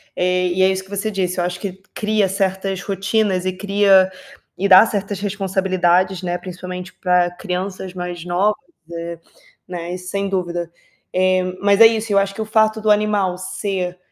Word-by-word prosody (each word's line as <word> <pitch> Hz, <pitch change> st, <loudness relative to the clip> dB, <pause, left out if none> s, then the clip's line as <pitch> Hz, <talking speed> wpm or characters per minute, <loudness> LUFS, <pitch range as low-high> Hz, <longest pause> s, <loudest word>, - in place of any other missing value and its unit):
Eh, 180 Hz, 0 st, +1 dB
e 180 Hz, +1 st, 0 dB
é 190 Hz, -, +5 dB
isso 190 Hz, 0 st, -2 dB
que 190 Hz, -, -20 dB
você 200 Hz, +2 st, -2 dB
disse, 185 Hz, -2 st, -2 dB
eu -, -, +1 dB
acho 180 Hz, 0 st, -3 dB
que 190 Hz, -1 st, -4 dB, 0.2 s
cria 210 Hz, -2 st, +1 dB
certas 190 Hz, 0 st, -1 dB
rotinas 195 Hz, -1 st, 0 dB
e 185 Hz, -, +1 dB
cria 195 Hz, -1 st, +4 dB, 0.5 s
e 200 Hz, +2 st, 0 dB
dá 190 Hz, +4 st, +9 dB
certas 205 Hz, -2 st, -3 dB
responsabilidades, 190 Hz, -2 st, +1 dB
né, 175 Hz, -1 st, -2 dB
principalmente 180 Hz, 0 st, -8 dB
pra 180 Hz, -1 st, +2 dB
crianças 185 Hz, 0 st, -5 dB
mais 180 Hz, -2 st, -5 dB
novas, 190 Hz, +6 st, +1 dB, 0.4 s
eh, 170 Hz, 0 st, -6 dB, 0.5 s
né, 175 Hz, -1 st, -5 dB
isso 180 Hz, 0 st, -7 dB
sem 200 Hz, 0 st, -2 dB
dúvida. 175 Hz, -3 st, -2 dB, 0.4 s
Eh, 185 Hz, 0 st, +2 dB, 0.2 s
mas 200 Hz, +1 st, +3 dB
é 225 Hz, -, +11 dB
isso, 225 Hz, -1 st, -2 dB
eu 200 Hz, -, +4 dB
acho 195 Hz, 0 st, -1 dB
que 220 Hz, -, -6 dB
o -, -, -2 dB
fato 220 Hz, 0 st, +2 dB
do 215 Hz, -, 0 dB
animal 205 Hz, -3 st, +1 dB
ser 185 Hz, -1 st, -3 dB
190 Hz, 180 wpm, -20 LUFS, 180-200 Hz, 0.5 s, é